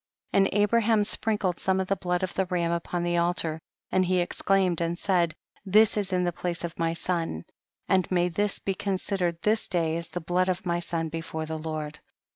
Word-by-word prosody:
74. - - +3 0.2
And 205 - +5
Abraham 225 0 +3
sprinkled 205 -3 0
some 190 0 +1
of 190 - -1
the 195 - +1
blood 180 -1 -1
of 185 - -2
the 190 -1 0
ram 175 -2 0
upon 170 +1 -2
the 175 0 +1
al 170 +1 +2
tar, 160 -2 -2 0.3
and 185 - +3
he 185 0 +2
exclaimed 180 0 +1
and 170 +1 -1
said, 175 -4 +1 0.3
this 210 +3 +5
is 200 -2 -1
in 180 -1 +2
the 175 - +1
place 175 +1 -3
of 170 -1 -5
my 165 0 +1
son, 165 - -2 0.4
and 185 -1 +2
may 180 -1 +2
this 205 +4 -1
be 195 - -2
considered 185 -3 -1
this 215 +1 +2
day 165 -3 0
as 170 -1 0
the 175 - -5
blood 180 +2 +1
of 185 +3 -2
my 175 -1 0
son 165 -1 -1
before 160 0 -4
the 160 0 -4
Lord. 155 -1 -5
180 Hz, 215 wpm, -27 LUFS, 170-190 Hz, 0.4 s, And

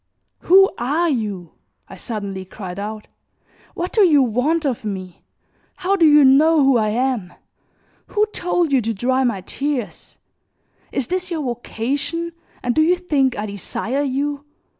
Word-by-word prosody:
"Who 385 +2 +5
are 305 +8 +1
you?" 205 - -3 0.4
I - - -11
suddenly 200 -5 -5
cried 190 0 -8
out; 210 +1 -6 0.7
"what 350 +1 -4
do 440 - +3
you 300 -7 +5
want 270 +8 0
of 255 -5 -2
me? 185 -4 -6 0.5
How 380 +2 0
do 335 -5 +5
you 295 -1 +7
know 300 +3 +5
who 270 -1 +4
I 220 -2 +2
am? 235 -5 -1 0.8
Who 425 0 +1
told 350 -3 0
you 265 -2 +3
to 225 0 -2
dry 260 +5 +1
my 235 -7 0
tears? 275 +3 -4 0.7
Is 270 - -1
this 365 +3 -3
your 325 -4 -3
vocation 270 +7 -3 0.3
and 245 - 0
do 310 - +3
you 340 +3 +4
think 290 -8 0
I 210 - -2
desire 215 +6 -3
you? 285 +1 -2
265 Hz, 155 wpm, -20 LUFS, 220-315 Hz, 0.8 s, you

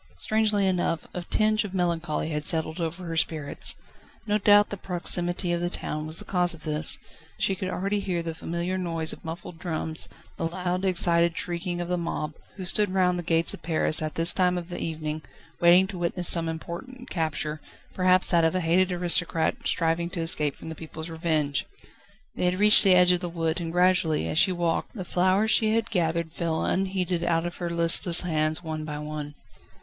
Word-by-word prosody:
Strangely 215 -2 +1
enough, 175 -4 0
a 180 - -4
tinge 215 +4 +1
of 195 -2 -7
melancholy 170 -3 -1
had 150 -1 -3
settled 160 0 +1
over 170 +2 -4
her 165 -1 -4
spirits. 155 -3 -1 0.5
No 210 -1 +1
doubt 205 0 +5
the - - -2
proximity 175 -1 -1
of 170 - -1
the 175 - -1
town 155 -2 -4
was 155 +1 0
the - - -3
cause 180 -2 +1
of 160 - -17
this. 155 0 -1 0.4
She 195 - 0
could 185 0 -4
already 195 +3 -2
hear 180 -4 -2
the 165 -1 -4
familiar 170 +3 -3
noise 165 -3 -1
of - - -13
muffled 165 +1 -8
drums, 160 -2 -3 0.3
the - - -1
loud, 180 +2 -3
excited 170 -2 +3
shrieking 175 0 -3
of 175 - -3
the 180 0 -1
mob, 155 -2 -4 0.2
who 190 - -6
stood 205 +3 +2
round 180 -1 +1
the - - -2
gates 165 -1 +1
of - - -10
Paris, 160 -1 +2
at 155 -1 -4
this 165 +1 +6
time 180 -1 +1
of 175 0 -6
the 175 - -5
evening, 155 -1 -4 0.4
waiting 175 +2 +6
to 185 -3 -7
witness 175 0 0
some 165 -1 +3
important 210 +11 -8
capture, 155 -2 -3 0.3
perhaps 185 0 +3
that 170 -2 +3
of 160 +2 +1
a - - +1
hated 180 +3 +2
aristocrat 170 -2 0
striving 165 0 0
to 175 -2 -4
escape 150 -3 +3
from - - -10
the - - -5
people's 160 +1 -9
revenge. 155 -4 -1 0.7
They - - -2
had 180 0 +1
reached 210 +2 +7
the 190 -3 +6
edge 180 0 +6
of 180 - +1
the 175 -1 -5
wood, 165 0 -2
and 165 -1 -4
gradually, 180 -3 +2
as 155 - 0
she 190 - +4
walked, 170 +2 -2
the 190 -5 -6
flowers 190 +5 +1
she 220 0 +2
had 230 0 -1
gathered 170 -3 -1
fell 165 -2 -2
unheeded 185 -2 -1
out 170 -1 0
of 175 - -5
her 175 -1 -4
listless 170 +1 +5
hands 155 -1 0
one 155 -1 -4
by 150 -1 -5
one. 150 -1 -6
170 Hz, 200 wpm, -26 LUFS, 160-185 Hz, 0.7 s, reached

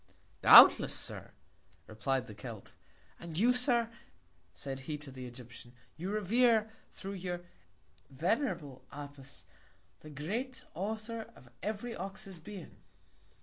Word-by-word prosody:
Doubtless, - - +9
Sir, - - -3 0.6
reply'd 125 +4 -1
the 110 - -10
Celt. 110 0 -9 0.5
And 170 -2 -7
you, 240 +6 +5
Sir, 245 -2 +3 0.7
said 135 -1 -5
he, 150 +3 -5
to 145 -2 -9
the 130 -1 -8
Egyptian, 120 0 -11 0.2
You 175 +5 -5
revere, 220 +2 +3 0.2
thro' 195 - -7
your 180 -2 -4 0.7
venerable 165 - -1
Apis, 140 -1 -10 0.5
the 155 - -12
great 215 - -4
Author 220 +5 -4
of 120 - -17
every 220 +3 -3
Ox's 195 0 -7
Being. 190 0 -10
175 Hz, 115 wpm, -33 LUFS, 135-215 Hz, 0.7 s, Doubtless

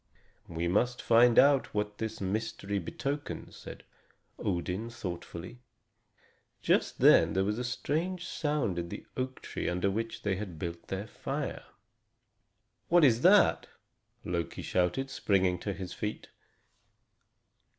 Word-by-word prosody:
"We 85 +1 -2
must 120 +7 +1
find 120 +1 +5
out 140 -3 +5
what 105 0 -2
this 110 0 -4
mystery 100 0 -2
betokens," 140 - -5
said - - -10 0.6
Odin 95 +4 -2
thoughtfully. 90 -1 -7 1.0
Just - - +1
then - - +6
there 95 - +2
was 105 +3 -1
a - - -2
strange 165 +8 -2
sound 145 - -1
in 85 0 -4
the - - -7
oak 130 0 -4
tree - - -3
under 90 +3 0
which 115 +2 -4
they 100 -3 0
had 95 -5 -6
built 85 +1 -6
their 95 +2 -3
fire. 135 +5 -4 1.2
"What 175 -1 +5
is 120 -4 +5
that?" 195 +5 +5 0.6
Loki 85 -1 -3
shouted, 90 +10 0
springing 95 -7 +1
to 100 - -3
his 95 -2 -6
feet. 105 0 -5
105 Hz, 130 wpm, -30 LUFS, 90-130 Hz, 1.2 s, then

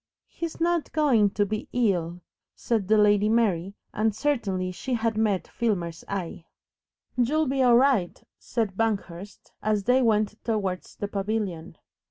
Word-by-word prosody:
"He's 335 -1 -6
not 340 -1 0
going 255 -10 +3
to 205 - +2
be 215 +1 -4
ill," 180 -8 0 0.3
said 220 -5 -1
the 215 +1 +4
Lady 210 0 +4
Mary, 200 -5 +1 0.2
and 215 -1 0
certainly 200 -10 -1
she 210 +8 -3
had 225 -1 0
met 215 -4 0
Filmer's 175 -8 -2
eye. 175 -4 -5 0.7
"YOU'LL 295 +6 +2
be 270 0 0
all 245 -2 +6
right," 250 -9 +2 0.2
said 220 -6 -2
Banghurst, 200 -3 -3
as 210 -1 0
they 250 +4 +3
went 215 -2 +1
towards 195 -5 -2
the 205 - -4
pavilion. 200 -4 -3
215 Hz, 145 wpm, -26 LUFS, 195-235 Hz, 0.7 s, all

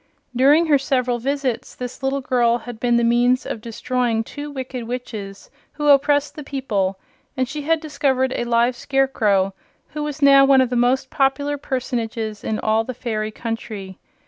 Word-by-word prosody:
During 285 +7 +5
her 295 -3 +4
several 250 -3 0
visits 270 -1 -2
this 250 +1 -7
little 270 +1 -1
girl 240 -2 +2
had 240 -1 -9
been 240 0 +2
the 235 - +2
means 245 +2 +3
of 220 - -5
destroying 235 0 -1
two 290 +5 -7
wicked 260 -3 -6
witches 215 -5 -7 0.2
who 295 0 0
oppressed 285 +1 +4
the 300 - -7
people, 210 -9 -2 0.4
and 255 -1 +1
she 295 +3 -5
had 325 +2 +1
discovered 275 -4 0
a 240 - -2
live 240 +1 +2
scarecrow 225 -8 +1 0.4
who 300 - -5
was 295 0 -4
now 275 -1 +8
one 270 -1 +5
of 255 -1 +2
the - - 0
most 255 +2 +1
popular 285 +1 +1
personages 230 -6 -3
in 220 - -1
all 220 +1 +1
the 255 +2 -6
fairy 215 -3 -3
country. 215 -4 -6
250 Hz, 170 wpm, -21 LUFS, 230-275 Hz, 0.4 s, now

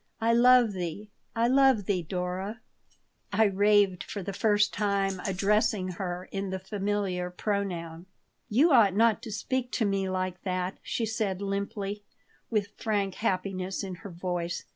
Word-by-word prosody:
"I 230 +1 +2
love 245 -2 +6
thee. 185 +3 -5 0.2
I 230 +1 +2
love 265 -5 +4
thee, 185 -2 0
Dora," 185 +5 -4 0.7
I 220 - +4
raved, 200 -2 +3
for 200 - -6
the 200 - -4
first 210 0 +2
time 195 -2 0
addressing 200 +1 +1
her 180 0 -4
in 195 0 -3
the 190 - -2
familiar 190 -2 -2
pronoun 180 -3 -3 0.4
"You 275 +10 +4
ought 215 -8 +5
not 225 0 +3
to 230 -2 -7
speak 250 +4 -2
to 225 - +1
me 195 -1 0
like 185 -1 -2
that," 185 0 -3
she 230 - -2
said, 215 -4 -2
limply, 200 +1 -3 0.5
with 205 -3 -1
frank 200 -3 -1
happiness 190 -2 -2
in 190 -1 -5
her 200 - -8
voice. 175 -1 -3
200 Hz, 150 wpm, -28 LUFS, 185-215 Hz, 0.7 s, love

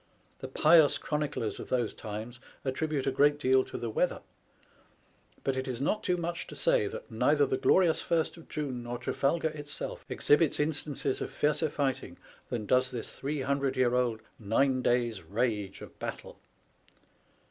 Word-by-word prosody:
The - - -5
pious 155 -2 +5
chroniclers 150 -7 -2
of - - -8
those 120 -4 0
times 110 +3 -7 0.3
attribute 140 +1 -1
a 135 - +2
great 145 +2 +4
deal 130 -2 +3
to - - -7
the 115 -2 -3
weather; - - 0 1.2
but 135 - 0
it 130 0 -3
is 125 -2 -3
not 180 +10 0
too 180 - +1
much 170 0 -3
to - - -9
say - - +2
that 485 +4 -8
neither 435 - +3
the 410 -1 0
glorious 180 - +4
First 165 -2 0
of 165 - -15
June 135 -5 -3
nor 120 0 -4
Trafalgar 140 +6 0
itself 150 -1 -5
exhibits 150 +1 +3
instances 145 -2 -1
of - - -2
fiercer 150 +1 +1
fighting 140 -3 -2 0.3
than 110 -3 -3
does 130 +4 +3
this 120 -3 -7
three 145 +1 -2
hundred 140 0 0
year 125 -1 +3
old 120 -3 +1 0.2
nine 130 +5 +2
days' 120 -5 +1
rage 105 +2 -2
of - - -12
battle. - - -6
135 Hz, 165 wpm, -30 LUFS, 120-155 Hz, 1.2 s, pious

